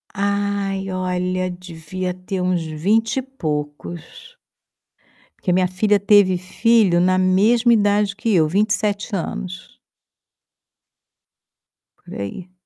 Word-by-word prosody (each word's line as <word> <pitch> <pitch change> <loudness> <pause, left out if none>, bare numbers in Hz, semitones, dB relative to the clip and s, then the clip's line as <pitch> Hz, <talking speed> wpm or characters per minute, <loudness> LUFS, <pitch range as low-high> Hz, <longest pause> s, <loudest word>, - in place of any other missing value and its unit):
Ai 200 -1 -1
olha, 185 0 -1
devia 180 +1 -6
ter 185 +1 -5
uns 180 -2 0
vinte 205 +10 0
e - - +1
poucos. 160 - -6 1.0
Porque 180 - -1
a - - +3
minha 185 0 +2
filha 205 +3 +1
teve 200 -2 +4
filho 195 0 +2
na 185 +1 +3
mesma 215 +6 +3
idade 205 -2 +2
que 220 +1 -1
eu, 160 -3 +4
27. 205 0 -2 2.3
Por - - -11
aí. 170 - -7
185 Hz, 105 wpm, -20 LUFS, 180-205 Hz, 2.3 s, teve